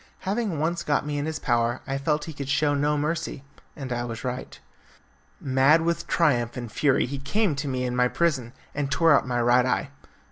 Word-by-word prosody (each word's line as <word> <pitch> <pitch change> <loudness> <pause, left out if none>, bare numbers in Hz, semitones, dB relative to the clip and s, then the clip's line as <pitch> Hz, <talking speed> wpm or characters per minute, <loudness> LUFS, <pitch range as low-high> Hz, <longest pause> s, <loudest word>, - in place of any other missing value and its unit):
Having 200 -3 -1
once 165 +3 -1
got 145 -1 0
me 145 -1 -2
in 145 - -2
his 160 - -3
power 120 -1 0
I 135 0 -2
felt 150 +2 0
he 160 - -7
could 140 -2 -6
show 145 +1 +2
no 145 +1 +1
mercy, 150 -2 -2 0.3
and 135 -5 -5
I 120 0 -2
was 115 -2 -6
right. 125 0 -5 0.8
Mad 135 +5 +4
with 170 0 -1
triumph 120 -8 +1
and 120 -3 -6
fury 140 +1 +2
he 140 +2 -5
came 195 +6 0
to 145 +2 -3
me 130 -1 -2
in 125 -1 -2
my 125 0 +3
prison 130 -6 0 0.2
and 140 -1 -2
tore 160 +2 +4
out - - +1
my 120 -1 0
right 120 +1 +4
eye. 130 +2 -1
140 Hz, 210 wpm, -25 LUFS, 125-155 Hz, 0.8 s, Mad